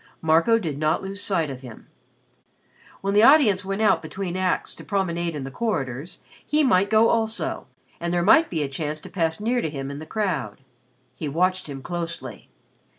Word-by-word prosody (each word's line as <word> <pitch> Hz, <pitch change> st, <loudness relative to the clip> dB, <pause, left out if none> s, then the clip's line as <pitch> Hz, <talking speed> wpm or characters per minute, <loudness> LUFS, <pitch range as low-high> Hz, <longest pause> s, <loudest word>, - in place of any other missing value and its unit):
Marco 165 Hz, +8 st, +4 dB
did 160 Hz, -10 st, -4 dB
not 155 Hz, +3 st, +1 dB
lose 195 Hz, +1 st, -4 dB
sight 165 Hz, -8 st, 0 dB
of 130 Hz, -1 st, -8 dB
him. 125 Hz, -4 st, -11 dB, 1.2 s
When 195 Hz, +1 st, -1 dB
the 205 Hz, -, +5 dB
audience 230 Hz, -7 st, +6 dB
went 195 Hz, +3 st, -2 dB
out 215 Hz, -, +4 dB
between 190 Hz, -3 st, -5 dB
acts 185 Hz, -1 st, -1 dB
to -, -, -11 dB
promenade 170 Hz, -4 st, -1 dB
in 145 Hz, -, -4 dB
the 135 Hz, -, -6 dB
corridors, 145 Hz, -, -3 dB, 0.2 s
he 300 Hz, +1 st, +2 dB
might 200 Hz, -6 st, +3 dB
go 220 Hz, +1 st, +5 dB
also 225 Hz, -1 st, -1 dB, 0.3 s
and 170 Hz, 0 st, -2 dB
there 175 Hz, 0 st, +1 dB
might 320 Hz, -, +5 dB
be 160 Hz, -3 st, -1 dB
a -, -, -2 dB
chance 150 Hz, +2 st, -4 dB
to -, -, -11 dB
pass 165 Hz, -3 st, -1 dB
near 240 Hz, +3 st, 0 dB
to 160 Hz, -, -2 dB
him 135 Hz, -2 st, -5 dB
in 140 Hz, -, -7 dB
the 155 Hz, -, -9 dB
crowd. 185 Hz, -, -2 dB, 0.5 s
He 155 Hz, -, -5 dB
watched 185 Hz, +3 st, 0 dB
him 135 Hz, -2 st, -7 dB
closely. 170 Hz, -1 st, -5 dB
175 Hz, 190 wpm, -24 LUFS, 155-205 Hz, 1.2 s, audience